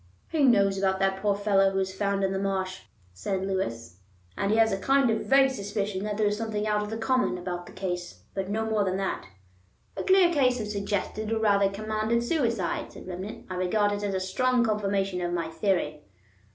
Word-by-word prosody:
"He 315 -3 +1
knows 200 -6 +4
about 190 -1 +1
that 195 0 0
poor 205 -1 +2
fellow 200 -1 +3
who 195 - -3
was 190 0 -1
found 200 0 0
in 190 - +1
the 190 - -1
marsh," 190 -1 -2 0.3
said 185 - -2
Lewis, 115 - -3 0.4
"and 200 - -1
he 215 - +3
has 225 -1 +4
a 195 - -1
kind 270 +2 +3
of 220 - -2
vague 270 0 +5
suspicion 205 -3 -3
that 210 -1 -3
there 215 - +2
is 205 0 +2
something 215 -1 -2
out 210 -1 +1
of 210 - -4
the 220 - -4
common 250 -3 +1
about 175 -1 -5
the - - -11
case; 180 -2 -5
but 195 -1 -3
no 220 +2 -1
more 220 -2 +1
than 190 -1 -1
that." 195 - -3 0.7
"A - - -3
clear 375 -2 +5
case 255 -4 +3
of 215 - -2
suggested, 210 +1 -3
or 225 - +1
rather 200 -3 +3
commanded 215 +3 -1
suicide," 235 - -1
said - - -11
Remnant. 185 +3 -7
"I 185 - -6
regard 195 +3 +1
it 205 0 -2
as 200 -2 -1
a - - +1
strong 245 +7 +1
confirmation 195 -4 0
of 175 0 -2
my 165 -2 -2
theory." 160 -4 -1
200 Hz, 215 wpm, -27 LUFS, 190-220 Hz, 0.7 s, vague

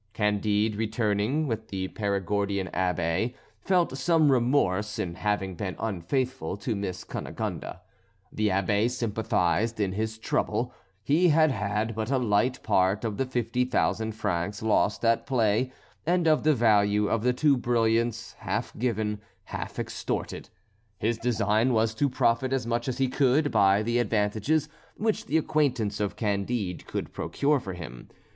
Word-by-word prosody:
Candide, 105 0 +1
returning 110 +5 0
with 110 -4 -3
the 95 -2 -4
Perigordian 100 -1 -1
Abbé, 90 +5 0 0.2
felt 180 -7 +1
some 160 0 +3
remorse 115 -5 +1
in 85 - -2
having 95 0 -1
been 95 +1 -4
unfaithful 110 - -2
to 110 +3 -2
Miss 95 -3 -4
Cunegonde. - - -5 0.6
The 110 0 +1
Abbé 100 +4 +2
sympathised 110 -2 0
in 100 -3 +1
his 110 +3 -3
trouble; 110 - -1 0.3
he 160 - +3
had 155 -1 +4
had 105 0 -1
but 110 +1 -3
a 135 - +2
light 120 +1 +1
part 100 +1 +2
of 105 -3 -2
the 135 - 0
fifty 125 0 0
thousand 110 -3 0
francs 100 0 -2
lost 105 0 +1
at 115 0 +2
play 120 -1 +1 0.3
and 175 0 +2
of 155 -1 +4
the 155 -1 +3
value 105 -3 +3
of 115 - 0
the 125 +2 +3
two 140 +3 +3
brilliants, 115 -2 0
half - - -3
given, 110 -3 -1 0.2
half - - -6
extorted. - - -4 0.5
His 115 +3 -1
design 115 +1 +2
was 110 0 +2
to 140 +5 +1
profit 130 +1 +1
as 130 -3 0
much 120 +1 -1
as 130 - -2
he 135 -1 +2
could 140 +3 +2
by 100 +1 +4
the 120 +2 +1
advantages 110 +7 +1 0.3
which 220 0 -1
the 155 - +2
acquaintance 140 -10 0
of 105 -1 -1
Candide 100 -2 -2
could - - -4
procure 145 0 0
for 95 -6 -6
him. 65 -9 -9
110 Hz, 150 wpm, -27 LUFS, 100-125 Hz, 0.6 s, had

